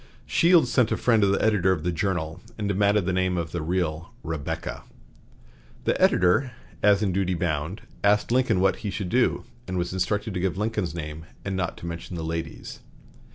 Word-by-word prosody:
Shields 170 -7 +4
sent 120 -3 +3
a - - +1
friend 115 -3 +3
to 100 - +4
the 100 - +1
editor 100 -4 +3
of 80 -5 -1
the 90 - 0
"Journal," 80 -2 -2 0.2
and 105 -2 -2
demanded 100 0 +2
the 95 - 0
name 95 0 +1
of 85 -2 -3
the 85 - -3
real 85 +3 -2
"Rebecca." 80 -3 -4 1.0
The - - 0
editor, 90 +9 +3 0.3
as 100 0 +4
in 100 - +1
duty 95 0 0
bound, 80 +3 -2 0.2
asked 105 +2 +3
Lincoln 120 -5 +3
what 95 0 +3
he 105 - -4
should 100 -2 -3
do, 125 +4 +2 0.2
and 95 -1 -3
was 90 0 -2
instructed 105 +3 -1
to 90 - -2
give 95 0 -1
Lincoln's 105 -5 -1
name, 80 -1 -6 0.2
and 95 -1 -2
not 90 -3 -2
to - - -9
mention 85 +1 -6
the 80 - -4
ladies. 80 +1 -5
95 Hz, 195 wpm, -25 LUFS, 85-105 Hz, 1.0 s, Shields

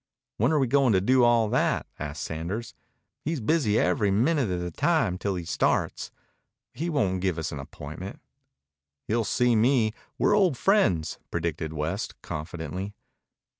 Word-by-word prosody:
"When 120 +7 +2
are 155 - +3
we 135 - +3
going 130 -1 +3
to 95 - +4
do 125 +6 +4
all 120 -2 +4
that?" - - +1
asked 75 0 -5
Sanders. 85 +9 -4 0.5
"He's 160 0 -2
busy 115 -3 +2
every 100 +2 +2
minute 125 +5 +2
of 90 -1 -1
the 90 0 -4
time 135 - +1
till 100 -1 -1
he 90 -2 -4
starts. - - 0 0.6
He 165 +7 -3
won't 95 - 0
give 95 -3 0
us 80 -1 -3
an 75 - -5
appointment." 75 +7 -8 0.8
"He'll 115 +1 0
see 120 +3 +2
me. 115 -1 +3 0.2
We're - - +3
old 185 -10 +3
friends," 100 - +2
predicted 80 -2 -2
West 80 +7 -3
confidently. 90 +5 -5
105 Hz, 155 wpm, -27 LUFS, 85-130 Hz, 0.8 s, to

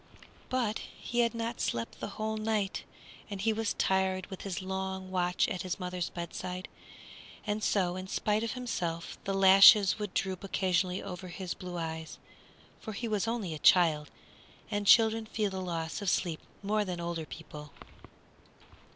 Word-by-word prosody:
But 235 -4 0
he 240 - -5
had 235 0 +3
not 230 +1 -3
slept 115 0 -2
the - - -4
whole 220 0 -1
night, 215 -2 -1 0.4
and 200 -2 -5
he 220 +3 +2
was 220 -1 -1
tired 190 -1 +1
with 190 - -7
his 195 -3 -3
long 190 0 -4
watch 180 -1 +1
at 185 - -3
his 185 +1 -3
mother's 180 -1 -3
bedside, 180 +2 -5 0.8
and 210 0 -1
so 180 -3 +1
in 185 0 -5
spite 210 +2 0
of 230 - -2
himself 175 -10 -3
the 195 - -1
lashes 195 +2 +8
would 210 -3 -4
droop 190 -1 -1
occasionally 185 -1 0
over 180 0 -6
his 180 0 -5
blue 180 -1 -7
eyes, 160 -1 -5 0.6
for 220 - -6
he 230 +3 -3
was 215 -1 0
only 225 -8 -2
a 155 - -6
child, 155 -5 +5 0.6
and 205 -1 -1
children 225 0 +6
feel 210 -2 -1
the 190 0 -4
loss 165 -2 -3
of 200 - 0
sleep 170 -3 0 0.2
more 210 +1 +1
than 180 -3 -4
older 170 -2 -3
people. 150 -2 -9
190 Hz, 165 wpm, -31 LUFS, 180-210 Hz, 0.8 s, lashes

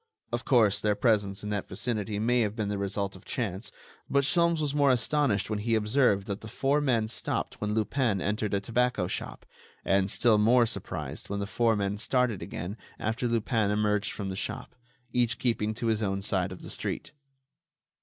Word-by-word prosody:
Of 120 0 -2
course, 110 -6 +4
their 105 -1 +2
presence 105 -3 +1
in 105 - -4
that 100 -2 -2
vicinity 105 +1 -2
may 120 +4 +2
have 105 -1 -1
been 110 -3 -2
the 100 -1 -2
result 100 0 -2
of 95 - -13
chance, 110 -5 -3 0.4
but 140 0 +3
Sholmes 170 +3 +3
was 150 -2 -1
more 145 -1 +4
astonished 125 -4 +2
when 105 - 0
he 115 +2 +1
observed 105 -2 +2
that 100 -1 -4
the 110 - -8
four 140 +5 +1
men 120 -6 +2
stopped 110 - -3
when 105 0 -1
Lupin 110 -1 +1
entered 105 +1 -1
a - - +2
tobacco 120 -1 +1
shop; - - -5 0.4
and 95 0 +2
still 110 +1 +3
more 120 +3 +5
surprised - - -5
when 100 0 -2
the 100 - -1
four 115 +2 +2
men 100 0 -1
started 125 -4 +1
again 95 +6 -5 0.2
after 110 +3 -1
Lupin 115 -2 +1
emerged 105 0 +1
from 100 -2 -4
the 95 - -4
shop, 100 - -5 0.4
each 120 -2 +2
keeping 110 -3 0
to 120 - -4
his 110 -1 +1
own 95 -2 -1
side 95 -2 0
of 95 - -9
the - - -7
street. - - -4
110 Hz, 195 wpm, -28 LUFS, 100-120 Hz, 0.4 s, more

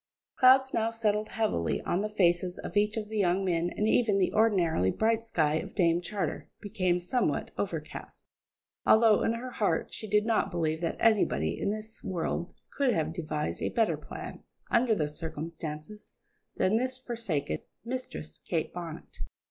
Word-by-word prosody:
Clouds 265 +1 +6
now 225 0 +1
settled 215 -2 0
heavily 215 - 0
on 175 - 0
the 210 - -2
faces 180 -3 +2
of - - -7
each 210 +1 +2
of 215 -1 -3
the 215 0 -3
young 190 0 +2
men, 170 -1 +1
and 210 +4 -1
even 220 -3 +3
the 190 - +1
ordinarily 180 - +3
bright 225 - +1
sky 155 -9 +1
of 195 - -8
Dame 170 -3 +3
Charter 180 -4 -3
became 190 -4 0
somewhat 180 +8 -1
overcast; - - -5 0.6
although, 220 -1 +6
in 225 - +2
her 250 +2 -5
heart, 200 -9 0
she 220 - -6
did 210 +1 +3
not 225 -1 +2
believe 160 -2 -1
that 165 - -1
anybody 80 - +3
in - - -1
this 215 +1 -6
world 175 -1 -2 0.2
could 275 -3 +3
have 160 -2 -1
devised 155 -2 -3
a - - 0
better 225 -2 +2
plan, - - -8 0.3
under 235 -1 +4
the 155 -6 0
circumstances, 160 +4 -7 0.4
than 200 +4 +2
this 255 +2 -1
forsaken 225 - -3 0.3
Mistress 230 - -5
Kate 165 -3 -2
Bonnet. 170 -3 -8
195 Hz, 165 wpm, -29 LUFS, 165-220 Hz, 0.6 s, Clouds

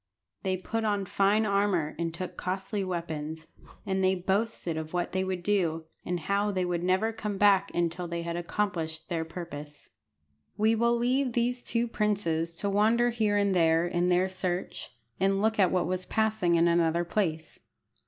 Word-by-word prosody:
They 185 -1 -1
put 225 +5 -3
on 205 -2 0
fine 200 +3 +2
armour, 200 -6 +1
and 165 -1 -1
took 180 +3 -6
costly 190 +2 -3
weapons, 160 -3 -4 0.4
and 190 -1 0
they 190 0 +3
boasted 190 -1 -1
of 160 +1 -5
what 175 -1 -1
they 190 0 0
would 185 -2 -3
do, 170 -5 0 0.2
and 180 -1 -2
how 200 +5 +1
they 185 -3 0
would 175 -1 -1
never 185 +5 +1
come 210 -2 -4
back 200 -1 +4
until 175 +1 -1
they 170 0 -3
had 170 0 -3
accomplished 170 -3 -2
their 165 -2 -1
purpose. 155 -3 -8 0.7
We 220 +1 +3
will 235 +1 +2
leave 250 +1 +1
these 245 +1 0
two 235 0 -1
princes 170 -7 0
to 200 - -2
wander 225 +4 +3
here 215 -3 +1
and 200 -1 +2
there 165 -1 +3
in 175 0 0
their 180 +1 +3
search, 185 -1 -4 0.3
and 195 +1 +2
look 220 +1 +1
at 185 -3 +5
what 180 -2 +1
was 185 +1 -3
passing 220 -6 +1
in 170 +1 +4
another 170 0 +2
place. 160 -4 -2
185 Hz, 175 wpm, -28 LUFS, 170-205 Hz, 0.7 s, at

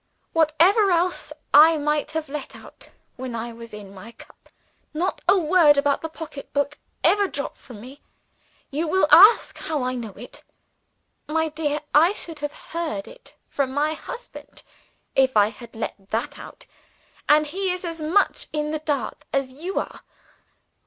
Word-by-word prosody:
Whatever 335 +7 +4
else 350 -2 0 0.2
I 315 +3 +8
might 300 +1 -1
let 285 -1 -7
out, - - -13 0.3
when 255 -2 -5
I 230 +1 -5
was 230 0 -11
in 205 -2 -10
my 210 +4 -11
cups, - - -18 0.5
not 360 +4 -1
a 390 - +6
word 320 -3 +5
about 280 0 +1
the 320 - -4
pocketbook 290 -2 -4 0.2
ever 405 -1 +4
dropped 280 -5 -5
from 240 -6 -12
me. 265 +5 -12 0.7
You 310 +4 -2
will 375 +3 +3
ask 410 +6 +7
how 300 -4 -2
I 255 0 -1
know 230 -5 -6
it. 245 - -11 0.8
My 320 +1 0
dear, 300 -1 -2
I 330 +6 +5
should 330 -6 -7
have 295 0 -3 0.2
heard 325 -3 -3
of - - -10
it - - -18
from 275 -2 -2
my 300 +2 +1
husband, 485 +10 -10 0.5
if 260 -3 +3
I 205 0 +5
had 230 +1 -13
let 200 -3 -6
that 225 +2 -3
out - - -11 0.6
and 300 +1 +5
he 375 +6 -2
is 360 0 -4
as 330 -1 -5
much 335 +7 +1
in 300 0 -2
the 310 - -2
dark 295 -3 -3
as 275 -1 0
you 325 +9 -6
are. - - -7
300 Hz, 165 wpm, -23 LUFS, 265-335 Hz, 0.8 s, I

